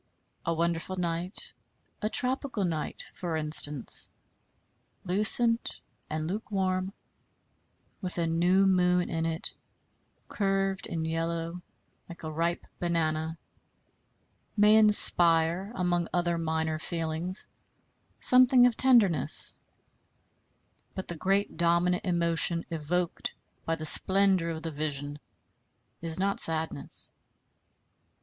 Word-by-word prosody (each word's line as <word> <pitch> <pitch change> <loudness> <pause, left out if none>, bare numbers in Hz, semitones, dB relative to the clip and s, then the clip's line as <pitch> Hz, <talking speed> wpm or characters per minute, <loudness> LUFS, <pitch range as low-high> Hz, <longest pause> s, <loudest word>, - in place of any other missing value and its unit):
A 165 - +1
wonderful 170 +2 -2
night, 175 +2 -2 0.5
a 215 - -1
tropical 255 -4 -2
night, 160 -3 -4
for 170 -3 -5
instance, 150 -2 +2 0.9
lucent 220 +5 +2 0.3
and 155 0 -4
lukewarm, 190 0 -3 1.1
with 180 -1 -2
a 170 - 0
new 175 +4 +2
moon 180 -1 +1
in 165 0 -2
it, 160 0 -3 0.7
curved 195 -1 -2
and 165 -1 -4
yellow 165 +1 -4 0.5
like 170 -1 -11
a 155 - -5
ripe 170 +2 -2
banana, 160 -2 -2 1.2
may 210 +1 +5
inspire, 175 -3 +6
among 175 -2 -1
other 175 -1 -1
minor 160 -1 -2
feelings 165 +3 -2 0.7
something 255 0 +5
of 245 -2 +2
tenderness; 210 - +3 1.4
but 190 - -7
the 175 - -4
great 195 +4 -1
dominant 170 +1 +1
emotion 170 -1 0
evoked 170 +2 -3 0.3
by 165 - -1
the 155 -1 -7
splendor 190 +1 +5
of 160 -1 -6
the 165 - -5
vision 145 -1 -4 0.8
is 165 +1 0
not 195 +1 -1
sadness. 160 -2 -1
170 Hz, 100 wpm, -27 LUFS, 160-190 Hz, 1.4 s, inspire